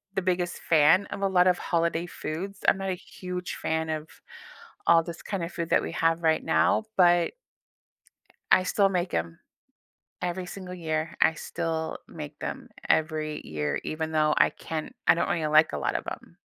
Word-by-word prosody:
the 195 Hz, -, +1 dB
biggest 180 Hz, -1 st, -1 dB
fan 165 Hz, +5 st, +4 dB
of -, -, -6 dB
a 195 Hz, -, +3 dB
lot 185 Hz, -1 st, +4 dB
of 180 Hz, -1 st, +4 dB
holiday 170 Hz, 0 st, 0 dB
foods. 185 Hz, +3 st, -6 dB
I'm -, -, +5 dB
not 195 Hz, 0 st, -3 dB
a -, -, +1 dB
huge 180 Hz, -2 st, -6 dB
fan 160 Hz, 0 st, -2 dB
of 155 Hz, 0 st, -3 dB, 0.8 s
all 165 Hz, -1 st, +6 dB
this 170 Hz, 0 st, -8 dB
kind 195 Hz, -4 st, -3 dB
of 170 Hz, +1 st, -4 dB
food 170 Hz, -1 st, -4 dB
that -, -, +4 dB
we -, -, -5 dB
have 165 Hz, +1 st, +1 dB
right 160 Hz, -1 st, +3 dB
now, 160 Hz, +7 st, +3 dB
but 175 Hz, -2 st, +4 dB, 1.2 s
I 185 Hz, -, +6 dB
still 195 Hz, +1 st, +3 dB
make 180 Hz, -1 st, -1 dB
'em 85 Hz, 0 st, -2 dB, 0.8 s
every 180 Hz, +1 st, -3 dB
single 180 Hz, 0 st, -7 dB
year. 160 Hz, -2 st, -2 dB
I 160 Hz, -, +5 dB
still 165 Hz, -1 st, -3 dB
make 150 Hz, -2 st, -9 dB
them -, -, -5 dB, 0.2 s
every 155 Hz, -1 st, +1 dB
year, 75 Hz, -1 st, -2 dB
even 160 Hz, 0 st, -3 dB
though 155 Hz, -1 st, +2 dB
I -, -, +5 dB
can't 160 Hz, +8 st, -6 dB
I -, -, +7 dB
don't 170 Hz, -, 0 dB
really 160 Hz, -3 st, 0 dB
like 155 Hz, +1 st, +5 dB
a -, -, -2 dB
lot -, -, -1 dB
of -, -, -2 dB
'em. -, -, -10 dB
170 Hz, 185 wpm, -27 LUFS, 155-180 Hz, 1.2 s, I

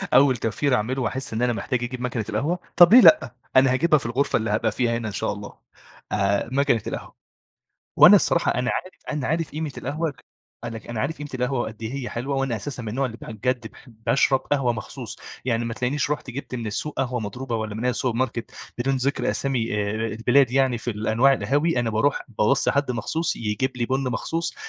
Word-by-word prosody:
أوَّل 130 Hz, -2 st, +6 dB
توفير 125 Hz, +5 st, 0 dB
هاعمله 125 Hz, +4 st, -1 dB
وأحس 125 Hz, 0 st, -3 dB
إن 110 Hz, -, -2 dB
أنا 125 Hz, -1 st, +2 dB
محتاج 120 Hz, +2 st, -2 dB
أجيب 125 Hz, +1 st, -5 dB
ماكنة 120 Hz, -3 st, -2 dB
القهوة، 150 Hz, +12 st, -1 dB, 0.2 s
طب 175 Hz, +3 st, +8 dB
ليه 250 Hz, -, +10 dB
لأ؟ 305 Hz, -, +6 dB, 0.2 s
أنا 130 Hz, 0 st, +6 dB
هاجيبها 155 Hz, +2 st, +3 dB
في -, -, -10 dB
الغرفة 125 Hz, +5 st, +1 dB
اللي 110 Hz, -1 st, -2 dB
هابقى 110 Hz, +1 st, +1 dB
فيها 115 Hz, 0 st, 0 dB
هنا، 115 Hz, -2 st, -4 dB
إن 105 Hz, -, -5 dB
شاء 95 Hz, -, -1 dB
الله. 105 Hz, 0 st, -9 dB, 0.5 s
آآ، 100 Hz, +2 st, +1 dB
ماكنة 135 Hz, -5 st, +2 dB
القهوة. -, -, -6 dB, 0.8 s
وأنا -, -, +9 dB
الصراحة -, -, +2 dB
أنا 125 Hz, +1 st, 0 dB
عارف 185 Hz, -, -5 dB, 0.2 s
أنا 145 Hz, -4 st, -2 dB
عارف 160 Hz, 0 st, -1 dB
قيمة 155 Hz, -1 st, -4 dB
القهوة، 150 Hz, +2 st, -3 dB, 0.5 s
أنا 115 Hz, -1 st, -5 dB
أنا 115 Hz, -2 st, -3 dB
عارف 150 Hz, +7 st, -2 dB
قيمة 145 Hz, 0 st, -7 dB
القهوة 125 Hz, 0 st, -1 dB
قد 110 Hz, +1 st, -12 dB
إيه 115 Hz, +4 st, -4 dB
هي 130 Hz, -3 st, -4 dB
حلوة، 135 Hz, +4 st, -3 dB
وأنا 135 Hz, -4 st, 0 dB
أساسًا 120 Hz, +4 st, -6 dB
من 110 Hz, -, -5 dB
النوع 130 Hz, +5 st, -1 dB
اللي 115 Hz, -, -7 dB
بجد 120 Hz, +1 st, -3 dB
باحب 115 Hz, -1 st, -15 dB
أشرب 135 Hz, +2 st, +3 dB
قهوة 135 Hz, -4 st, 0 dB
مخصوص. 110 Hz, -2 st, -7 dB, 0.3 s
يعني، 120 Hz, -2 st, 0 dB
ما 115 Hz, -1 st, -3 dB
تلاقِينيش 140 Hz, +4 st, -1 dB
رُحت 145 Hz, -3 st, -3 dB
جبت 130 Hz, +1 st, -7 dB
من 120 Hz, -2 st, -4 dB
السوق 125 Hz, +8 st, -4 dB
قهوة 125 Hz, -2 st, -1 dB
مضروبة 115 Hz, +3 st, -4 dB
والّا 110 Hz, -1 st, -4 dB
من 115 Hz, +3 st, -4 dB
أي 125 Hz, -, +3 dB
السوبر 125 Hz, -1 st, -1 dB
ماركت، 120 Hz, -2 st, -2 dB, 0.3 s
بدون 135 Hz, +2 st, +1 dB
ذِكر 135 Hz, +2 st, 0 dB
أسامي 125 Hz, -6 st, -1 dB
آآ، 105 Hz, -1 st, 0 dB, 0.2 s
البلاد 120 Hz, +4 st, +3 dB
يعني. 130 Hz, -2 st, +2 dB
في 120 Hz, -, -3 dB
الأنواع 110 Hz, +5 st, +3 dB
القهاوي، 145 Hz, +3 st, +1 dB
أنا 115 Hz, -1 st, -1 dB
بارُوح 110 Hz, +6 st, +1 dB
باوصِي 105 Hz, -2 st, +2 dB
حد 140 Hz, -2 st, 0 dB
مخصوص 155 Hz, +8 st, -1 dB
يجيب 115 Hz, +4 st, -2 dB
لي 120 Hz, -1 st, -1 dB
بُن 135 Hz, +1 st, 0 dB
مخصوص، 165 Hz, +8 st, -2 dB
125 Hz, 210 wpm, -24 LUFS, 115-135 Hz, 0.8 s, ليه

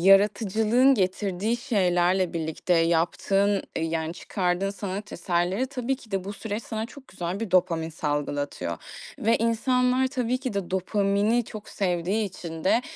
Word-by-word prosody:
yaratıcılığın 210 Hz, +6 st, +5 dB
getirdiği 195 Hz, +2 st, 0 dB
şeylerle 185 Hz, -6 st, +2 dB
birlikte 165 Hz, +1 st, -1 dB
yaptığın, 175 Hz, +4 st, +2 dB
eee, -, -, 0 dB
yani, 160 Hz, 0 st, -2 dB
çıkardığın 185 Hz, +1 st, -1 dB
sanat 200 Hz, 0 st, -5 dB
eserleri, 180 Hz, +6 st, 0 dB
tabii 265 Hz, 0 st, -2 dB
ki 225 Hz, -, -17 dB
de 195 Hz, -2 st, -1 dB
bu 200 Hz, -, -4 dB
süreç 210 Hz, +1 st, -4 dB
sana 220 Hz, 0 st, -4 dB
çok 275 Hz, +1 st, -14 dB
güzel 180 Hz, +3 st, -4 dB
bir 225 Hz, -, -3 dB
dopamin 165 Hz, -3 st, +2 dB
salgılatıyor 145 Hz, -, -2 dB, 0.4 s
ve 225 Hz, +2 st, +3 dB
insanlar 250 Hz, +3 st, +2 dB
tabii 255 Hz, -2 st, -1 dB
ki 255 Hz, -4 st, -3 dB
de 195 Hz, -3 st, -3 dB
dopamini 200 Hz, +4 st, +1 dB
çok 215 Hz, 0 st, -9 dB
sevdiği 190 Hz, +3 st, 0 dB
için 170 Hz, -4 st, -7 dB
de 230 Hz, +5 st, +4 dB
195 Hz, 145 wpm, -26 LUFS, 175-225 Hz, 0.4 s, yaratıcılığın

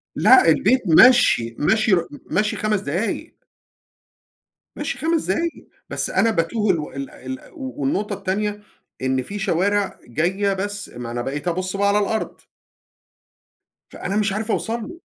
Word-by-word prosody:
لأ، -, -, +6 dB
البيت 255 Hz, 0 st, +3 dB
مَشْي، 165 Hz, -, +5 dB
مَشْي 215 Hz, +7 st, +2 dB
رُ 170 Hz, -2 st, +2 dB
م 145 Hz, -, -10 dB, 0.2 s
مَشْي 210 Hz, +1 st, +1 dB
5 215 Hz, -1 st, 0 dB
دقايق. 175 Hz, +8 st, -3 dB, 1.4 s
مَشْي 295 Hz, -, -3 dB
5 320 Hz, +3 st, 0 dB
دقايق، 335 Hz, 0 st, -2 dB, 0.2 s
بس -, -, -1 dB
أنا 230 Hz, -, +2 dB
باتوه 210 Hz, +3 st, +1 dB
الو 155 Hz, -3 st, -4 dB
ال 140 Hz, 0 st, -5 dB
ال 130 Hz, 0 st, -8 dB
و 265 Hz, -, -7 dB
والنقطة 190 Hz, +10 st, -1 dB
التانية 205 Hz, +2 st, -2 dB, 0.4 s
إن 130 Hz, 0 st, 0 dB
في 205 Hz, +7 st, -6 dB
شوارع 195 Hz, +1 st, 0 dB
جاية 185 Hz, -, 0 dB
بس 205 Hz, +1 st, -4 dB
ما 120 Hz, -1 st, -7 dB
أنا 120 Hz, 0 st, -3 dB
بقيت 145 Hz, +6 st, -4 dB
أبُص 185 Hz, +2 st, -2 dB
بقى 200 Hz, 0 st, +2 dB
على 200 Hz, +1 st, +3 dB
الأرض. 215 Hz, +2 st, -2 dB, 1.5 s
فأنا 195 Hz, -, -4 dB
مش 210 Hz, -2 st, +1 dB
عارف 220 Hz, +2 st, -2 dB
أوصل 230 Hz, +2 st, -1 dB
له. 345 Hz, -, -11 dB
200 Hz, 150 wpm, -21 LUFS, 165-215 Hz, 1.5 s, لأ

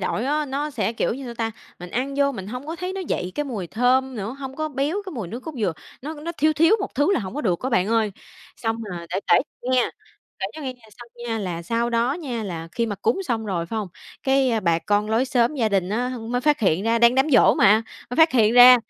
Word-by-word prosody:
đổi 225 Hz, -, -1 dB
á, 300 Hz, +2 st, +1 dB
nó 285 Hz, +3 st, -2 dB
sẽ, 220 Hz, -5 st, -1 dB
kiểu 225 Hz, -, -1 dB
như, 270 Hz, +1 st, -7 dB
sao 240 Hz, -, -6 dB
ta? 225 Hz, -1 st, -2 dB, 0.3 s
Mình 180 Hz, 0 st, -9 dB
ăn 265 Hz, +6 st, -2 dB
vô 280 Hz, 0 st, +3 dB
mình 190 Hz, -7 st, -7 dB
hông 250 Hz, +6 st, -6 dB
có 325 Hz, +2 st, -4 dB
thấy 365 Hz, +2 st, -4 dB
nó 385 Hz, -, -4 dB
dậy 185 Hz, -, -3 dB
cái 295 Hz, -, -1 dB
mùi 220 Hz, -10 st, -4 dB
thơm 255 Hz, +6 st, +2 dB
nữa, 220 Hz, +5 st, -4 dB
hông 270 Hz, -1 st, -7 dB
có 310 Hz, 0 st, -2 dB
béo 295 Hz, +8 st, -1 dB
cái -, -, -5 dB
mùi 220 Hz, -, -5 dB
nước 235 Hz, +7 st, -6 dB
cốt 320 Hz, +4 st, -7 dB
dừa. 200 Hz, -6 st, +1 dB, 0.3 s
Nó 305 Hz, +4 st, -5 dB
nó 315 Hz, +3 st, -6 dB
thiếu 310 Hz, +1 st, +4 dB
thiếu 330 Hz, +7 st, +4 dB
một -, -, -4 dB
thứ 290 Hz, +8 st, +3 dB
là 285 Hz, -, +1 dB
hổng 190 Hz, +1 st, -6 dB
có 295 Hz, -, -2 dB
được 185 Hz, -, 0 dB
á 260 Hz, -, -2 dB
bạn 185 Hz, -4 st, +2 dB
ơi. 220 Hz, -3 st, +1 dB, 0.4 s
Xong 225 Hz, -1 st, -1 dB
mà 170 Hz, -1 st, -6 dB
để 190 Hz, -, -1 dB
kể -, -, +6 dB, 0.2 s
nghe, 255 Hz, 0 st, +2 dB, 0.5 s
kể 190 Hz, -, -1 dB
cho 310 Hz, -, -7 dB
nghe 260 Hz, -, -3 dB
về 245 Hz, -, -27 dB, 0.2 s
sau 240 Hz, -, -11 dB, 0.2 s
nha, 225 Hz, -1 st, -1 dB
là 175 Hz, -4 st, -4 dB
sau 235 Hz, +5 st, -1 dB
đó 235 Hz, +3 st, +2 dB
nha, 260 Hz, -9 st, -4 dB
là 165 Hz, -4 st, -5 dB
khi 235 Hz, -1 st, 0 dB
mà 210 Hz, -, -2 dB
cúng 385 Hz, -, 0 dB
xong 230 Hz, -, -2 dB
rồi 175 Hz, -4 st, -2 dB
phải 225 Hz, -, -5 dB
hông? 210 Hz, -3 st, -2 dB, 0.3 s
Cái 265 Hz, -5 st, +2 dB
bà 170 Hz, -3 st, +2 dB
con 205 Hz, +4 st, 0 dB
lối 230 Hz, +4 st, +3 dB
xóm 245 Hz, +2 st, +2 dB
gia 230 Hz, -5 st, +1 dB
đình 190 Hz, -3 st, +1 dB
á 245 Hz, +5 st, -1 dB, 0.2 s
mới 245 Hz, +1 st, 0 dB
phát 295 Hz, 0 st, +2 dB
hiện 185 Hz, -3 st, +2 dB
ra, 230 Hz, +1 st, +2 dB
đang 235 Hz, +1 st, +6 dB
đám 270 Hz, +4 st, +2 dB
giỗ 250 Hz, -, +6 dB
mà, 215 Hz, +2 st, +5 dB, 0.3 s
mới 245 Hz, -, -4 dB
phát 320 Hz, 0 st, +6 dB
hiện 225 Hz, -3 st, +4 dB
ra, 250 Hz, +1 st, +10 dB
240 Hz, 270 wpm, -23 LUFS, 210-275 Hz, 0.5 s, ra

